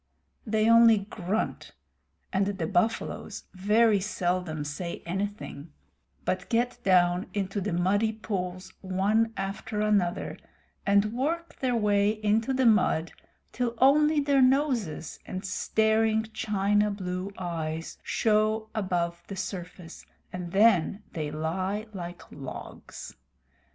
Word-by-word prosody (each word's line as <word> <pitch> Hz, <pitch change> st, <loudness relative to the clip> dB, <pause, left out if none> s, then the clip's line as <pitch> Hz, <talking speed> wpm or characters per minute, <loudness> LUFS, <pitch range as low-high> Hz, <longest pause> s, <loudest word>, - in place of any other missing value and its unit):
They 215 Hz, 0 st, +2 dB
only 230 Hz, -1 st, +7 dB
grunt, 200 Hz, +1 st, -3 dB, 0.6 s
and 195 Hz, +1 st, +2 dB
the 200 Hz, -1 st, -2 dB
buffaloes 205 Hz, +4 st, -1 dB
very 210 Hz, +3 st, +3 dB
seldom 180 Hz, -5 st, -2 dB
say 170 Hz, +4 st, -5 dB
anything, 180 Hz, -5 st, -5 dB, 0.5 s
but 185 Hz, 0 st, -2 dB
get 240 Hz, +1 st, 0 dB
down 180 Hz, -1 st, +3 dB
into 200 Hz, 0 st, -2 dB
the 205 Hz, +2 st, -2 dB
muddy 195 Hz, +6 st, +2 dB
pools 190 Hz, -4 st, -5 dB
one 205 Hz, +4 st, +1 dB
after 200 Hz, +3 st, -4 dB
another, 205 Hz, -5 st, +1 dB, 0.5 s
and 200 Hz, +2 st, +3 dB
work 330 Hz, +7 st, -2 dB
their 255 Hz, -2 st, +1 dB
way 205 Hz, -2 st, +3 dB
into 215 Hz, +3 st, +1 dB
the 260 Hz, -1 st, +1 dB
mud 210 Hz, -7 st, +3 dB, 0.4 s
till 240 Hz, -1 st, -2 dB
only 300 Hz, +4 st, +5 dB
their 280 Hz, -1 st, +3 dB
noses 255 Hz, -, +1 dB
and 185 Hz, +1 st, -5 dB
staring 220 Hz, +3 st, +2 dB
china 210 Hz, -1 st, +1 dB
blue 185 Hz, -1 st, -4 dB
eyes 165 Hz, -3 st, -4 dB
show 220 Hz, 0 st, +1 dB
above 175 Hz, -5 st, -1 dB
the 195 Hz, -, -6 dB
surface, 180 Hz, -2 st, -7 dB, 0.3 s
and 180 Hz, -1 st, -5 dB
then 200 Hz, -1 st, +3 dB
they 155 Hz, -3 st, -3 dB
lie 185 Hz, +7 st, -2 dB
like 175 Hz, -2 st, -7 dB
logs. 135 Hz, -2 st, -9 dB
200 Hz, 115 wpm, -28 LUFS, 180-220 Hz, 0.6 s, only